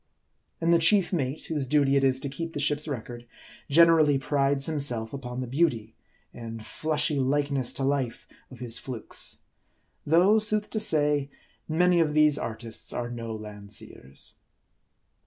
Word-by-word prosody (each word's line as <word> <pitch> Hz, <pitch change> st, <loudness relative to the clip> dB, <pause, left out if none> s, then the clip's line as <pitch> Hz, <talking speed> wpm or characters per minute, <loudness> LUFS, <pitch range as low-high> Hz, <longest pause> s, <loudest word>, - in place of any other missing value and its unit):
And 170 Hz, +1 st, +3 dB
the 170 Hz, -, +5 dB
chief 190 Hz, +3 st, +3 dB
mate, 140 Hz, -2 st, -2 dB
whose 150 Hz, -5 st, -2 dB
duty 140 Hz, 0 st, +3 dB
it 140 Hz, -, +3 dB
is 130 Hz, -1 st, +3 dB
to 140 Hz, -, -3 dB
keep 165 Hz, +4 st, -5 dB
the -, -, -3 dB
ship's 150 Hz, +1 st, 0 dB
record, 120 Hz, -3 st, -6 dB, 0.4 s
generally 160 Hz, -2 st, +6 dB
prides 140 Hz, 0 st, +1 dB
himself 140 Hz, -8 st, 0 dB
upon 125 Hz, -2 st, -5 dB
the 130 Hz, -, -4 dB
beauty, 120 Hz, -6 st, 0 dB, 0.4 s
and 115 Hz, -1 st, -7 dB
flushy 150 Hz, -2 st, -1 dB
likeness 140 Hz, -1 st, 0 dB
to 135 Hz, -, -4 dB
life, 135 Hz, -3 st, -1 dB, 0.2 s
of 130 Hz, -, -12 dB
his 120 Hz, -1 st, -4 dB
flukes; 125 Hz, -5 st, -5 dB, 0.7 s
though, 180 Hz, +8 st, +5 dB
sooth 210 Hz, 0 st, -1 dB
to 215 Hz, -, -1 dB
say, 150 Hz, -7 st, +1 dB, 0.4 s
many 175 Hz, +2 st, +3 dB
of 155 Hz, -2 st, +1 dB
these 150 Hz, -1 st, +4 dB
artists 115 Hz, 0 st, -5 dB
are 120 Hz, 0 st, -3 dB
no 115 Hz, -2 st, -5 dB
Landseers. 105 Hz, -10 st, -7 dB
140 Hz, 150 wpm, -27 LUFS, 120-155 Hz, 0.7 s, generally